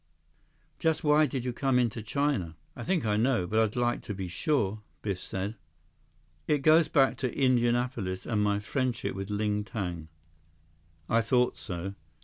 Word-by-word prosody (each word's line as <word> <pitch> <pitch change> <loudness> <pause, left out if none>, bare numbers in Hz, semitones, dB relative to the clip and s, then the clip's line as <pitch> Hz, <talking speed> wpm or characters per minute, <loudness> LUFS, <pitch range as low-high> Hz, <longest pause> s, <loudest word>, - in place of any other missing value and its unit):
"Just 160 -1 +1
why 150 0 +5
did 130 -2 -4
you 125 - -1
come 135 0 +1
into 120 -2 +1
China? 110 - -1 0.2
I - - -7
think 175 0 0
I 105 -1 +1
know, 120 -4 +2
but 110 +5 +1
I'd 110 -2 +1
like 120 -1 +1
to 105 - -5
be 95 -1 -4
sure," 105 - 0 0.2
Biff 100 -4 -2
said. 100 +4 -4 0.9
"It 150 -3 +1
goes 155 +1 +6
back 135 -4 +3
to 130 -2 -1
Indianapolis 120 -6 +1
and - - -6
to - - +2
my 100 -1 +2
friendship 120 +3 -2
with 95 +1 -5
Ling 105 0 0
Tang." 90 -6 -4 1.0
"I 115 - +3
thought 125 +2 +2
so." 90 +2 -5
115 Hz, 165 wpm, -29 LUFS, 100-130 Hz, 1.0 s, goes